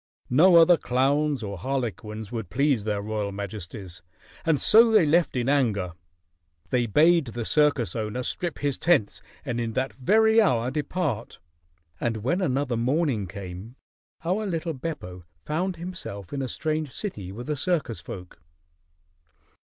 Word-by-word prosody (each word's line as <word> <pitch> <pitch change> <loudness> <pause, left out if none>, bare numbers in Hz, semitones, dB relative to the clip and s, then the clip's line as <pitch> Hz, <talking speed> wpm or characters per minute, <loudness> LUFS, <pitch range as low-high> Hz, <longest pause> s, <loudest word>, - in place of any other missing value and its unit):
No 170 +8 +6
other 170 +1 +7
clowns 140 +1 +1
or 100 -2 -5
harlequins 110 -3 -4
would 110 -7 -5
please 135 -1 +1
their 105 -2 -1
royal 105 -1 -2
majesties, 100 -2 -7 0.4
and 160 -4 +2
so 225 +2 +7
they 215 -6 +5
left 160 -1 +2
in 125 -1 -1
anger. 110 -11 +1 0.8
They 120 -2 +2
bade 160 - +4
the 115 0 -5
circus 145 -5 +2
owner 110 +3 -3
strip 170 +5 -3
his 145 -2 -2
tents 160 -12 +2 0.2
and 120 0 -2
in 115 -1 -3
that 130 +3 -1
very 220 - +4
hour 125 - +2
depart, 145 - -3 0.6
and 115 -3 -2
when 170 +10 +1
another 135 -6 0
morning 125 - 0
came, 95 +5 -8 0.5
our 200 +5 0
little 165 -2 -2
Beppo 125 - -6 0.2
found 180 +5 -1
himself 165 - -7
in 140 - -2
a 130 - -2
strange 155 +1 -2
city 105 - -5
with 120 +5 -7
the 150 - -2
circus 150 - -1
folk. 90 -3 -10
130 Hz, 145 wpm, -26 LUFS, 110-160 Hz, 0.8 s, other